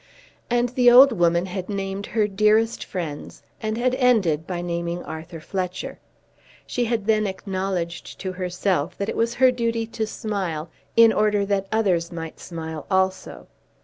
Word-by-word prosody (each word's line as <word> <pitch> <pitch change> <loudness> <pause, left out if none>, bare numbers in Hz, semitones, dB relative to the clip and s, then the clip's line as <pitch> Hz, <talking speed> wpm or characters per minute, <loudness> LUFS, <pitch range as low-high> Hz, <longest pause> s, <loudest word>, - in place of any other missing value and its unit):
And 240 0 +2
the 245 0 +5
old 260 +3 +9
woman 175 -3 +2
had 185 0 -5
named 195 0 -3
her 215 -2 +1
dearest 215 +3 +2
friends, 165 -6 -6 0.2
and 215 0 -2
had 250 +1 +1
ended 215 - +2
by 180 -2 -3
naming 170 0 -3
Arthur 160 +1 -8
Fletcher. 185 +2 -4 0.7
She 245 - -1
had 225 -3 -1
then 215 -1 +2
acknowledged 190 -3 -4
to 190 - -3
herself 180 -2 -1
that 200 +2 -2
it - - -3
was 230 +1 0
her 260 0 +5
duty 230 -2 -1
to 220 -1 -3
smile 185 -9 -4 0.2
in 230 -1 +7
order 210 -1 +2
that 195 -1 -1
others 185 -7 +1
might 165 -2 -7
smile 160 -3 -7
also. 190 -1 -1
195 Hz, 155 wpm, -23 LUFS, 175-225 Hz, 0.7 s, old